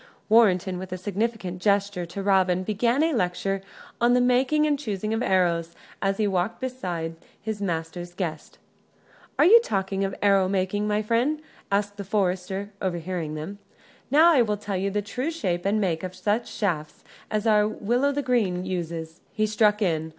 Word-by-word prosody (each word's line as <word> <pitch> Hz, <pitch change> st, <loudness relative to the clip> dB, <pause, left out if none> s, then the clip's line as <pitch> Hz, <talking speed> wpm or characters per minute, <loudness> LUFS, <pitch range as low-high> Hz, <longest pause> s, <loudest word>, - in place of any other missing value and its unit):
Warrenton, 190 Hz, -5 st, +4 dB
with 185 Hz, 0 st, -6 dB
significant 200 Hz, -2 st, -3 dB
gesture 200 Hz, -3 st, +1 dB
to 195 Hz, +4 st, -6 dB
Robin, 185 Hz, -2 st, +3 dB
began 235 Hz, +8 st, +1 dB
a 325 Hz, 0 st, +2 dB
lecture 195 Hz, -2 st, -1 dB, 0.4 s
on 240 Hz, +1 st, +4 dB
the -, -, +4 dB
making 255 Hz, +5 st, +3 dB
and 295 Hz, -2 st, +1 dB
choosing 215 Hz, -4 st, -3 dB
of 225 Hz, -, -1 dB
arrows, 170 Hz, -4 st, +1 dB, 0.3 s
as 195 Hz, 0 st, 0 dB
he 215 Hz, -, +1 dB
walked 190 Hz, +1 st, -1 dB
beside 180 Hz, -11 st, -4 dB, 0.2 s
his 215 Hz, -1 st, -5 dB
master's 175 Hz, -1 st, -4 dB
guest. 165 Hz, -5 st, -5 dB, 0.8 s
"Are 300 Hz, -, +5 dB
you 445 Hz, +7 st, +9 dB
talking 195 Hz, -, -1 dB
of 195 Hz, 0 st, -2 dB
arrow 195 Hz, -2 st, +3 dB
making, 200 Hz, +2 st, 0 dB
friend?" 240 Hz, +8 st, +1 dB, 0.3 s
asked 205 Hz, 0 st, 0 dB
the 200 Hz, -, -4 dB
forester, 190 Hz, 0 st, -1 dB
overhearing 175 Hz, -3 st, -3 dB
them. 190 Hz, +7 st, -6 dB, 0.5 s
"Now 320 Hz, +4 st, +6 dB
I 270 Hz, -, +5 dB
will 210 Hz, -3 st, 0 dB
tell 205 Hz, -1 st, -4 dB
you 190 Hz, +2 st, 0 dB
the 205 Hz, +1 st, -1 dB
true 250 Hz, +8 st, -3 dB
shape 190 Hz, -, -2 dB
and 210 Hz, +2 st, +2 dB
make 170 Hz, -6 st, 0 dB
of 185 Hz, 0 st, -6 dB
such 205 Hz, +5 st, -1 dB
shafts 155 Hz, -8 st, -3 dB, 0.3 s
as 215 Hz, 0 st, -1 dB
our 210 Hz, -2 st, +4 dB
Will 235 Hz, +4 st, -1 dB
o' 285 Hz, -, +3 dB
th' 285 Hz, -1 st, -2 dB
Green 195 Hz, -8 st, +1 dB
uses," 170 Hz, -2 st, -4 dB
he 215 Hz, -2 st, +1 dB
struck 210 Hz, 0 st, +2 dB
in. 160 Hz, -3 st, 0 dB
200 Hz, 170 wpm, -25 LUFS, 180-220 Hz, 0.8 s, you